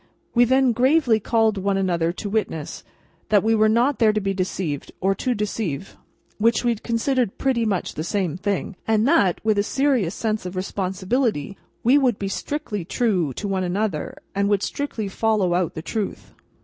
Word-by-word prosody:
We 245 0 +5
then 260 +1 +3
gravely 250 -1 +3
called 220 -1 +1
one 195 0 0
another 170 -3 +1
to 195 +4 -6
witness, 200 -7 -3 0.5
that 205 -3 +4
we 225 +1 +3
were 215 -1 +4
not 240 +6 +2
there 220 -3 +5
to 215 - 0
be 195 -1 -1
deceived, 185 -6 -3
or 195 +1 +2
to 250 +5 -1
deceive—which 210 - -3
we 240 -1 +3
considered 235 +1 -1
pretty 255 -4 +1
much 195 -5 -1
the 155 - -4
same 180 -3 -1
thing—and 205 +4 -1
that, 275 - +3
with 215 -2 +3
a - - +5
serious 260 - +1
sense 215 -1 -1
of 180 - -7
responsibility, 195 - -1 0.3
we 260 +5 +5
would 250 -6 +2
be 195 - -3
strictly 210 - -3
true 185 - 0
to 205 - -4
one 190 -1 -1
another, 185 -2 -2 0.2
and 200 +1 +1
would 200 -1 +2
strictly 260 -7 -3
follow 200 -2 +1
out 175 -2 0
the 160 - -5
truth. 215 +1 -4
210 Hz, 175 wpm, -23 LUFS, 190-235 Hz, 0.5 s, We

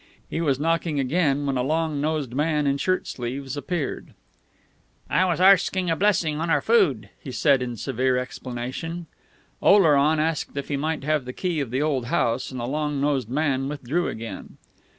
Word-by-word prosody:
He 165 - -1
was 140 -5 +1
knocking 165 -1 0
again 145 0 +1
when 135 -2 0
a - - +1
long 155 +1 0
nosed 150 -5 -1
man 150 +1 +1
in 140 0 +1
shirt 185 +3 0
sleeves 130 +2 -5
appeared. 155 +1 -4 1.0
"I 185 - +3
was 175 -2 0
arsking 185 -1 +4
a - - +2
blessing 160 -5 +1
on 165 - -1
our 150 -3 +4
food," 180 - +2
he 135 - -8
said 140 0 +3
in 120 -2 -4
severe 130 +1 0
explanation. 130 +7 -5 0.6
Oleron 155 -6 +5
asked 155 -2 -1
if 140 - -4
he 145 - 0
might 155 +1 -2
have 150 -2 0
the 125 - -6
key 175 -1 -2
of 140 -5 -2
the 130 +5 0
old 135 -6 -1
house; 120 +1 0
and 130 - -6
the 120 - -3
long 150 +2 -2
nosed 135 -5 0
man 135 -1 0
withdrew 150 +4 -2
again. 110 -4 -7
145 Hz, 180 wpm, -24 LUFS, 130-165 Hz, 1.0 s, Oleron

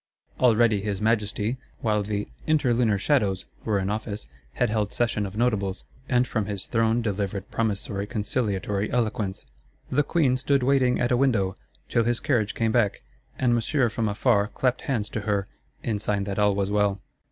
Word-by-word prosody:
Already 115 -4 +4
his 100 -1 -2
Majesty, 110 +1 0 0.2
while 105 -2 +1
the 105 0 -2 0.2
"interlunar 125 -8 +3
shadows" 100 -6 +1 0.2
were 105 -2 +1
in 95 +1 -1
office, 105 0 -4 0.3
had 105 - +1
held 105 -2 0
session 110 -4 0
of 95 +2 -9
Notables; 105 -5 0 0.3
and 125 -1 +3
from 110 -5 -1
his 100 -2 -3
throne 115 0 +1
delivered 100 -2 -3
promissory 100 -2 -1
conciliatory 105 -3 -1
eloquence: 110 -5 -1 0.5
"The 145 - +3
Queen 145 -4 +2
stood 140 0 +1
waiting 130 -1 +3
at 120 - +1
a 125 - +4
window, 110 -8 +2 0.3
till 115 - +2
his 120 +1 +1
carriage 115 -7 0
came 115 -1 +1
back; 110 - +1 0.3
and 125 -2 +2
Monsieur 120 +2 +2
from 110 0 -1
afar 100 0 +2
clapped 125 +3 0
hands 115 -6 -1
to 110 - -3
her," 100 -2 -1 0.4
in 110 -3 -1
sign 100 -1 -1
that 100 0 -3
all 105 -1 +3
was 100 0 -1
well. 105 -1 +2
110 Hz, 170 wpm, -25 LUFS, 100-120 Hz, 0.5 s, Already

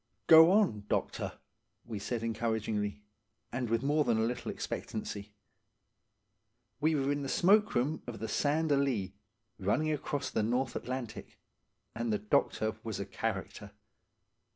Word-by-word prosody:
"Go 160 +1 +9
on, 185 - +2
doctor," - - -1 0.5
we 110 -3 -5
said 115 +3 -3
encouragingly, 110 -2 -2 0.5
and 125 -2 -2
with 115 +2 +1
more 150 +2 +3
than 120 -4 +2
a 110 - +2
little 120 +2 -2
expectancy. 105 -1 -5 1.5
We 155 +2 +2
were 140 -1 +1
in 145 0 -1
the 135 - -4
smoke 205 +5 +4
room 135 +6 0
of 120 -2 -5
the 110 - -4
Sand 150 +7 +1
a 140 - +5
lea, 115 -9 0 0.5
running 130 +11 +1
across 145 -1 -2
the - - +1
North 125 +5 0
Atlantic; 125 -3 -5 0.6
and 115 0 -2
the 105 - +2
doctor 110 +1 0
was 110 -2 -4
a 100 - -3
character. 100 0 -4
120 Hz, 145 wpm, -32 LUFS, 110-145 Hz, 1.5 s, Go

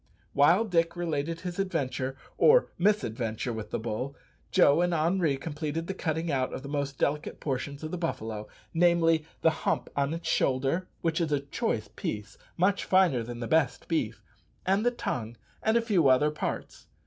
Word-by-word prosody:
While 170 +10 +5
Dick 170 -4 +1
related 165 -1 -2
his 180 0 -5
adventure, 135 -8 -1 0.2
or - - +5
mis 210 +3 +3
adventure, 115 +1 -3
with 110 -1 -6
the - - -1
bull, 120 +5 -4 0.3
Joe 145 +4 +5
and 175 -1 +2
Henri 165 -2 +2
completed 155 +2 -4
the 195 - -3
cutting 160 -2 -2
out 130 -2 0
of - - -5
the - - -7
most 140 -2 -2
delicate 150 +1 -1
portions 140 +1 -3
of 155 - -4
the 180 - -3
buffalo 110 -10 -3 0.3
namely, 165 -2 +3 0.2
the 160 - +6
hump - - 0
on 140 +3 0
its 165 - -6
shoulder 135 +8 +1
which 165 0 0
is 160 -2 0
a 145 - +2
choice 115 -6 -2
piece, 105 0 -5 0.2
much 190 +3 +2
finer 185 -10 +4
than 120 +1 -6
the 115 - -3
best 140 -4 +1
beef 125 -10 -1 0.4
and 195 +3 +2
the 245 - +4
tongue, 120 - -4 0.2
and 220 +1 +3
a - - +3
few 200 - +3
other 135 +3 +4
parts. 150 - -5
155 Hz, 180 wpm, -28 LUFS, 130-175 Hz, 0.4 s, the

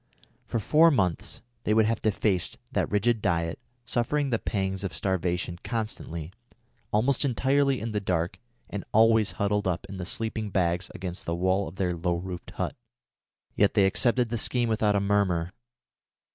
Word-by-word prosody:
For - - -1
four 155 +9 +5
months 95 - 0 0.2
they 105 - +2
would 110 -1 +5
have 115 0 0
to 110 - +3
face 95 -5 0
that - - 0
rigid 110 +2 +2
diet, 85 -2 0 0.3
suffering 135 +4 0
the 115 - +1
pangs 95 -1 -2
of 90 -6 -3
starvation 90 +1 -1
constantly, 95 -8 -4 0.6
almost 125 +7 +2
entirely 135 +1 +2
in 115 +1 -4
the 105 - 0
dark, 90 -3 -1 0.3
and 100 - -5
always 110 -1 +5
huddled 100 0 0
up 90 -2 -1
in 100 0 -7
the 90 - -4
sleeping 110 0 -2
bags 90 -1 0
against 90 -1 -6
the 85 - 0
walls 95 +3 +1
of 80 - -9
their 90 -2 0
low 85 +1 0
roofed 90 0 -6
hut. - - -3 0.8
Yet 100 +2 +3
they 100 -3 +5
accepted 120 +5 +2
the 120 0 -1
scheme 120 0 +1
without 105 -2 +2
a - - +3
murmur. 100 -4 +1
100 Hz, 170 wpm, -27 LUFS, 90-115 Hz, 0.8 s, four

